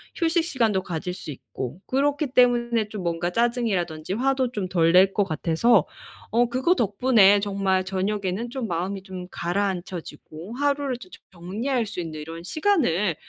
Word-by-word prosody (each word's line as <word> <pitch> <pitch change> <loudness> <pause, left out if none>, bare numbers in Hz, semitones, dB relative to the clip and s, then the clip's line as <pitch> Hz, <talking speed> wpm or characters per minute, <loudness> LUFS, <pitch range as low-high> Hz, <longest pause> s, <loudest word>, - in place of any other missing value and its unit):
휴식 335 -1 +1
시간도 230 - 0
가질 180 0 -4
수 180 -4 -7
있고. 130 - -7
그렇기 285 +1 0
때문에 235 -3 +3
좀 210 -3 -6
뭔가 170 0 -1
짜증이라든지 190 -8 -1
화도 260 +2 +1
좀 205 -6 -3
덜 165 -2 +3
낼 190 +2 +5
것 205 - +2
같아서 165 +6 +2 0.5
어 240 +1 +3
그거 260 +9 +2
덕분에 210 - +4
정말 195 -2 0
저녁에는 195 +3 -2
좀 250 -1 -4
마음이 190 +2 -3
좀 185 -2 -8
가라앉혀지고 175 -1 -4
하루를 285 -1 0
조 225 -6 -13
좀 - - -13
저 180 - -19
정리할 225 +8 -1
수 200 - -6
있는 160 -2 -6
이런 165 +2 -8
시간을 210 - +1
200 Hz, 335 characters per minute, -24 LUFS, 175-245 Hz, 0.5 s, 낼